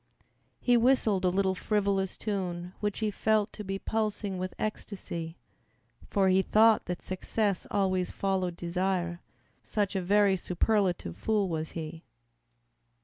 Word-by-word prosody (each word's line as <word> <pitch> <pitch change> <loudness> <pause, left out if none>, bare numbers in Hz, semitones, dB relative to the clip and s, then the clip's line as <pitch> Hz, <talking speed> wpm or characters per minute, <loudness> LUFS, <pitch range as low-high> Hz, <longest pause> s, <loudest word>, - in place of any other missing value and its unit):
He 245 -1 +4
whistled 230 -5 +3
a - - +5
little 190 +1 +1
frivolous 195 -1 0
tune 180 -4 -3
Which 210 +1 -2
he 215 -1 +1
felt 215 0 +1
to 210 - -7
be 195 0 -3
pulsing 210 -2 -2
with 185 0 -4
ecstasy, 170 -6 -5 0.7
For 195 -1 +3
he 190 +1 +5
thought 220 +3 +4
that 180 -1 -4
success 195 +1 -1
always 185 -2 +1
followed 190 -3 -1
desire, 175 0 -1 0.4
Such 205 -2 -1
a 190 - +1
very 200 +1 +4
superlative 180 - 0
fool 210 -3 +1
was 160 -1 -3
he. 160 0 -6
195 Hz, 135 wpm, -29 LUFS, 180-210 Hz, 0.7 s, a